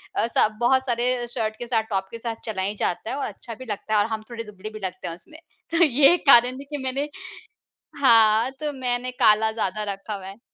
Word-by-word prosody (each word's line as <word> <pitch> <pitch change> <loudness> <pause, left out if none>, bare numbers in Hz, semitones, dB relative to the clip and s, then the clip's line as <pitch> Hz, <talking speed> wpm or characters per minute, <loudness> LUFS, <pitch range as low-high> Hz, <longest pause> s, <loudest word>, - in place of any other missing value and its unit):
अ, - - +2
सब 215 -2 +1
बहुत 260 +2 +3
सारे 245 +1 +1
अ, - - -3
शर्ट 220 -3 -2
के 240 - -6
साथ, 225 -3 +1
टॉप 190 -1 -1
के 230 - -6
साथ 230 -1 -4
चला 210 -4 -3
ही 200 +2 -2
जाता 200 +2 -2
है - - -2
और 280 - -2
अच्छा 235 - -9
भी 255 +4 -10
लगता 215 +1 -4
है 210 - +4
और 205 - +3
हम 215 0 -4
थोड़े 230 -1 -6
दुबले 210 -1 -9
भी 215 0 -9
लगते 185 -1 -5
हैं 165 - -5
उसमें। 310 - -16 0.3
तो 335 +1 +4
ये 285 +2 +6
कारण 250 0 +6
है - - -7
कि 295 - -4
मैंने 275 +3 -2 0.9
हाँ, 225 -1 +5
तो 300 -1 -2
मैंने 250 -1 -2
काला 220 +1 +5
ज़्यादा 215 -1 -2
रखा 195 +2 -7
हुआ 195 -2 -7
है। 195 +3 -10
230 Hz, 240 wpm, -24 LUFS, 215-255 Hz, 0.9 s, ये